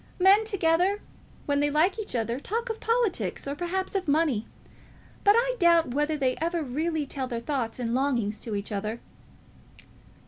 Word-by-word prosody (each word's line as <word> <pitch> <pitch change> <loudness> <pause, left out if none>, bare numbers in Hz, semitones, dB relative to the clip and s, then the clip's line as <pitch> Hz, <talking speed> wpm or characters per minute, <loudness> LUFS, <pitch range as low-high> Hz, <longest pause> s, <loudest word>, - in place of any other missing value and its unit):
Men 390 +4 +5
together, 375 -1 +2 0.5
when 285 -1 +1
they 290 0 +2
like 330 +8 +2
each 415 -11 -3
other, 235 +2 -1
talk 460 +9 -3
of 450 - -6
politics, 460 - 0
or 280 - -2
perhaps 355 +4 -3
of 380 -3 -2
money; 285 -7 +1 0.8
but 410 0 +6
I - - +2
doubt 335 -6 +4
whether 295 +2 0
they 260 -3 +1
ever 335 +1 -1
really 305 +3 -2
tell 270 -1 -3
their 240 -2 -3
thoughts 240 -3 -2
and 235 -2 -2
longings 240 -6 0
to 220 -3 -4
each 200 +1 -4
other." 215 +3 -3
305 Hz, 170 wpm, -27 LUFS, 255-375 Hz, 0.8 s, but